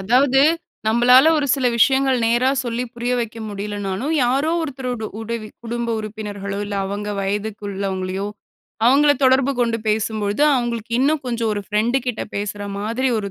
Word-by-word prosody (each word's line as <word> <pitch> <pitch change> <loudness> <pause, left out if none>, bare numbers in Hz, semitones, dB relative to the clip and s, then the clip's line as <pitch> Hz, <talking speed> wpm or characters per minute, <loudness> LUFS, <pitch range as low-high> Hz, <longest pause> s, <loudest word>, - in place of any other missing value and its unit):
அதாவது, 255 +6 +3 0.5
நம்மளால 250 +6 +6
ஒரு 285 - 0
சில 265 -3 0
விஷயங்கள் 265 +1 +4
நேரா 240 +3 +3
சொல்லி 240 +1 -2
புரிய 240 +1 -2
வைக்க 230 0 -5
முடியலனாலு, 205 +2 -4 0.2
யாரோ 275 +6 +1
ஒருத்தரரோட 255 -6 -4
உதவி, 225 -1 -5 0.2
குடும்ப 235 0 -3
உறுப்பினர்களோ, 205 -2 -5
இல்ல 205 0 -4
அவங்க 205 +1 -4
வயதுக்கு 205 +2 -3
உள்ளவங்களையோ, 190 0 -3 0.6
அவங்கள 290 +3 +5
தொடர்பு 260 +1 +4
கொண்டு 230 -1 +1
பேசும் 215 0 0
பொழுது, 205 +8 0
அவுங்களுக்கு 235 -2 -2
இன்னும் 290 +2 +2
கொஞ்ச, 235 -2 -2
ஒரு 205 -1 -3
பிரெண்ட் 230 +5 +2
கிட்ட 245 -3 -2
பேசுற 205 0 -4 0.2
மாதிரி 230 +6 -1
ஒரு, 200 -1 -4
230 Hz, 150 wpm, -21 LUFS, 205-255 Hz, 0.6 s, நம்மளால